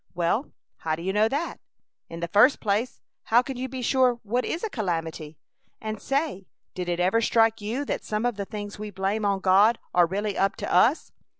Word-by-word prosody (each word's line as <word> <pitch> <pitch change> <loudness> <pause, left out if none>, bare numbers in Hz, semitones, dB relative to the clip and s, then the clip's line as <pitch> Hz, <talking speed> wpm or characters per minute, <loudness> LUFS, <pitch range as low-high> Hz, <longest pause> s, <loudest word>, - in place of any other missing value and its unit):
"Well, 175 - 0 0.3
how 155 -1 -2
do 165 - -9
you 190 +1 -1
know 215 +2 +3
that? 295 +6 -2 0.5
In 165 0 -8
the 170 - -2
first 210 - +5
place, 215 +3 -1 0.2
how 240 +2 +4
can 270 +1 -6
you 255 +1 -4
be 255 -1 -5
sure 255 0 +3
what 240 +4 -1
is 335 - -3
a 445 - -1
calamity? 165 - -3 0.4
And 215 -2 -5
say, 275 - -2 0.3
did 180 -1 -4
it 175 0 -1
ever 190 +6 +2
strike 225 -1 +3
you 235 +8 -3
that - - -3
some 215 +2 -2
of 245 -2 0
the 200 -1 -4
things 205 0 -7
we 210 0 -5
blame 200 +2 -2
on 200 -1 +1
God 200 +5 +5 0.2
are 175 -1 +5
really 200 +3 -2
up 195 0 +1
to - - -4
us? 230 - +3
210 Hz, 210 wpm, -25 LUFS, 190-245 Hz, 0.5 s, first